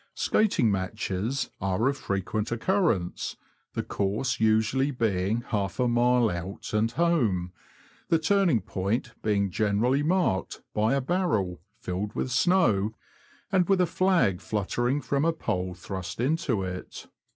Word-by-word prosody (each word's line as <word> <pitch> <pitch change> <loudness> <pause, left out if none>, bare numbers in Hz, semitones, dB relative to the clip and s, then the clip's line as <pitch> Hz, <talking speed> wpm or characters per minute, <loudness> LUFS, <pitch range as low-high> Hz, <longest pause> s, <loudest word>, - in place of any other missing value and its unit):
Skating 195 - +2
matches 95 +6 -2
are 95 +5 +1
of 140 - +1
frequent 100 0 -2
occurrence, 120 - 0 0.4
the - - -1
course 105 +6 -1
usually 110 +5 +2
being 110 -4 0
half 100 -1 -2
a 125 - +3
mile 120 0 +3
out 90 +5 -6
and 105 +1 +2
home, 115 - +1 0.5
the 165 - +3
turning 175 - +2
point 105 +6 -2
being 100 -2 +1
generally 110 +7 +1
marked 165 - 0
by 110 +5 +2
a 140 - +1
barrel, 125 - 0 0.2
filled 100 -1 -4
with 130 - -2
snow, 125 - +3 0.6
and 185 -1 +2
with 195 -1 +4
a 180 - +5
flag 170 - +2
fluttering 120 +8 -1
from 140 0 0
a 165 - +3
pole 90 - -3
thrust 95 +1 -6
into 130 - 0
it. 90 0 -6
115 Hz, 135 wpm, -27 LUFS, 95-140 Hz, 0.6 s, a